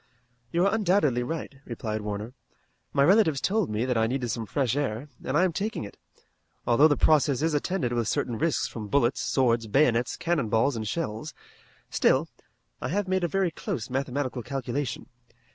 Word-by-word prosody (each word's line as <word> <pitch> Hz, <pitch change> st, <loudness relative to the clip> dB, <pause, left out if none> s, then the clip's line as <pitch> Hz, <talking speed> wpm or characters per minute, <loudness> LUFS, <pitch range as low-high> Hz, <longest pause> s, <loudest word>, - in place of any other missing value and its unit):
"You 175 Hz, +2 st, +2 dB
are 200 Hz, -, +2 dB
undoubtedly 180 Hz, -, +2 dB
right," 150 Hz, +4 st, -4 dB
replied 110 Hz, -3 st, -4 dB
Warner. 105 Hz, +3 st, -5 dB, 0.6 s
"My 140 Hz, -, +3 dB
relatives 175 Hz, -4 st, +4 dB
told 205 Hz, +2 st, +1 dB
me 110 Hz, +3 st, -1 dB
that 125 Hz, -2 st, 0 dB
I 110 Hz, -, +3 dB
needed 125 Hz, 0 st, -2 dB
some 115 Hz, -2 st, -4 dB
fresh 130 Hz, +2 st, 0 dB
air, 140 Hz, -1 st, -2 dB
and 130 Hz, -, 0 dB
I 175 Hz, -, +4 dB
am 185 Hz, -2 st, +1 dB
taking 205 Hz, -, -2 dB
it, 100 Hz, -, -9 dB, 0.7 s
although 130 Hz, +6 st, +6 dB
the 145 Hz, -, +2 dB
process 150 Hz, -2 st, +3 dB
is 160 Hz, -1 st, +1 dB
attended 145 Hz, -4 st, -1 dB
with 120 Hz, -2 st, 0 dB
certain 115 Hz, 0 st, -1 dB
risks 165 Hz, -2 st, +1 dB
from 110 Hz, -3 st, -7 dB
bullets, 125 Hz, +2 st, +2 dB
swords, 115 Hz, -4 st, +1 dB
bayonets, 120 Hz, 0 st, +2 dB
cannon 160 Hz, -10 st, 0 dB
balls, 115 Hz, +5 st, +2 dB
and 110 Hz, -1 st, -3 dB
shells. 150 Hz, 0 st, -4 dB, 0.6 s
Still, -, -, +3 dB, 0.5 s
I -, -, -2 dB
have 200 Hz, +3 st, -1 dB
made 185 Hz, -1 st, 0 dB
a -, -, +2 dB
very 190 Hz, 0 st, 0 dB
close 120 Hz, -6 st, -5 dB
mathematical 130 Hz, -1 st, -2 dB
calculation. 130 Hz, +1 st, -3 dB
135 Hz, 180 wpm, -27 LUFS, 115-165 Hz, 0.7 s, although